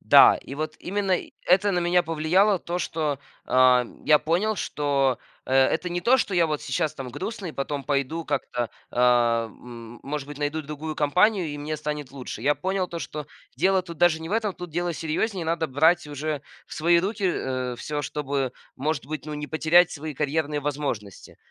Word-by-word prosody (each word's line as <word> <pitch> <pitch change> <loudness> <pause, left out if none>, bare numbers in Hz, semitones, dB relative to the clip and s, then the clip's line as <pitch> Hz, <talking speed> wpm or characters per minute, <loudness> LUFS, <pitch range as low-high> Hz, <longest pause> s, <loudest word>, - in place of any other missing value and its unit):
Да, - - +8
и 135 - -8
вот 155 +1 -3
именно 195 0 -1
и - - -11
это 195 +3 +4
на 175 - +1
меня 175 +1 +3
повлияло 175 +6 +2
то, 175 +1 -3
что, 155 -5 -2 0.3
а, 125 -1 +5 0.2
я 150 -1 +6
понял, 190 +7 +1
что, 140 -6 0 0.3
э, - - -4
это 145 +7 +3
не 175 0 -2
то, 240 +9 +5
что 205 - -1
я 170 -2 +4
вот 150 -2 -2
сейчас 155 -3 -1
там 135 -3 -6
грустный, 170 - -5
потом 140 0 -3
пойду 145 +4 -1
как-то, 120 -1 -2 0.2
э, - - -10
м 120 -1 +1
может 145 0 -4
быть, 145 0 -8
найду 150 +2 -1
другую 150 +2 -5
компанию, 180 +6 +3
и 145 - -5
мне 155 +1 -3
станет 150 -3 -4
лучше. 125 -4 -7
Я 145 +2 +3
понял 190 0 -1
то, 170 - -5
что 150 -3 -6 0.3
дело 190 +4 +3
тут 170 -2 -9
даже 165 -2 +4
не 160 - -6
в 200 - -4
этом. 220 -2 +1
Тут 180 -2 -8
дело 175 +2 -1
серьёзнее. 170 +5 -2
Надо 165 0 0
брать 160 +4 +3
уже 150 0 -3 0.3
в - - -9
свои 170 +2 +4
руки, 200 +2 -2
э, 130 -7 -1
всё, 150 +3 -3
чтобы, 140 -3 -2 0.2
может 145 -1 -2
быть, 155 0 -5
ну, 150 - -4
не 150 0 -5
потерять 165 +2 +4
свои 155 0 -6
карьерные 150 +1 -1
возможности. 135 -9 -4
155 Hz, 195 wpm, -25 LUFS, 140-175 Hz, 0.3 s, Да